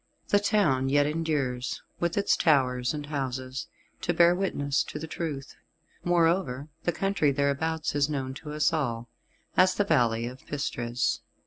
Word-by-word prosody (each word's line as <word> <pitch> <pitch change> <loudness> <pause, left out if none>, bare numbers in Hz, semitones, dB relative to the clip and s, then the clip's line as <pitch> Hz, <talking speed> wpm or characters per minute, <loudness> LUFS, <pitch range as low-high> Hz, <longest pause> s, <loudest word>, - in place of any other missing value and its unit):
The 205 - +5
town 165 -11 +2
yet 145 +1 +4
endures, 145 -5 -1 0.2
with 170 +1 -1
its 200 - +3
towers 125 -5 +2
and 150 -1 -4
houses, 130 -2 -4 0.3
to 175 - 0
bear 170 +1 +6
witness 145 -7 0
to - - -6
the 155 - -5
truth; 155 -4 -5 0.5
moreover 165 -5 +1 0.2
the 175 - +3
country 195 -5 +1
thereabouts 145 +3 0
is 145 0 +2
known 135 -3 -2
to 150 - -7
us 150 +3 +2
all 120 -6 -2 0.5
as 185 0 +5
the 205 - +2
Valley 120 - +2
of 125 +2 -8
Pistres. 120 -4 -1
145 Hz, 150 wpm, -28 LUFS, 130-165 Hz, 0.5 s, bear